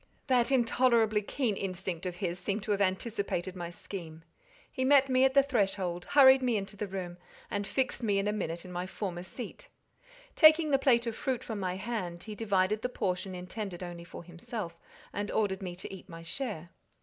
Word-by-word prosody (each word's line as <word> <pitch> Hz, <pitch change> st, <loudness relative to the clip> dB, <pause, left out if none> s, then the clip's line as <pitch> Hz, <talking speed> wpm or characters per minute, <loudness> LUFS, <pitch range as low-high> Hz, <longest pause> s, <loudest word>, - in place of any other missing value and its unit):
That 255 Hz, -2 st, +3 dB
intolerably 235 Hz, -4 st, +3 dB
keen 220 Hz, +1 st, -1 dB
instinct 185 Hz, -2 st, -4 dB
of 180 Hz, -, -4 dB
his 180 Hz, -2 st, -3 dB
seemed 200 Hz, +3 st, -2 dB
to 215 Hz, -, -2 dB
have 200 Hz, -1 st, +1 dB
anticipated 190 Hz, -2 st, -1 dB
my 175 Hz, -2 st, -5 dB
scheme: 165 Hz, -3 st, -8 dB, 0.5 s
he 260 Hz, -, -2 dB
met 275 Hz, 0 st, +5 dB
me 255 Hz, 0 st, +5 dB
at 265 Hz, 0 st, +2 dB
the 275 Hz, -, +7 dB
threshold, 195 Hz, -9 st, 0 dB
hurried 265 Hz, -2 st, +7 dB
me 245 Hz, -3 st, +2 dB
into 200 Hz, +1 st, -5 dB
the 205 Hz, +1 st, -3 dB
room, 180 Hz, -2 st, -5 dB, 0.3 s
and 205 Hz, 0 st, -2 dB
fixed 255 Hz, +3 st, -1 dB
me 205 Hz, -4 st, +1 dB
in 195 Hz, +1 st, +1 dB
a 210 Hz, -, +1 dB
minute 170 Hz, -4 st, -3 dB
in 180 Hz, -, -9 dB
my 180 Hz, +1 st, -3 dB
former 185 Hz, -3 st, -4 dB
seat. 185 Hz, +7 st, -8 dB, 0.7 s
Taking 310 Hz, -1 st, +7 dB
the 275 Hz, -, +4 dB
plate 245 Hz, -3 st, +4 dB
of 230 Hz, -1 st, -2 dB
fruit 260 Hz, 0 st, -2 dB
from 220 Hz, -3 st, -4 dB
my 185 Hz, -2 st, -1 dB
hand, 190 Hz, -4 st, -4 dB
he 215 Hz, -, -6 dB
divided 205 Hz, -1 st, +1 dB
the 250 Hz, -, -1 dB
portion 185 Hz, -4 st, -2 dB
intended 180 Hz, 0 st, -6 dB
only 175 Hz, -1 st, -7 dB
for 170 Hz, -, -10 dB
himself, 170 Hz, +1 st, -6 dB, 0.3 s
and 205 Hz, 0 st, -2 dB
ordered 200 Hz, -3 st, 0 dB
me 180 Hz, -2 st, -5 dB
to 185 Hz, -, -8 dB
eat 190 Hz, 0 st, -11 dB
my 165 Hz, -1 st, -9 dB
share. 170 Hz, -, -4 dB
200 Hz, 195 wpm, -31 LUFS, 180-235 Hz, 0.7 s, the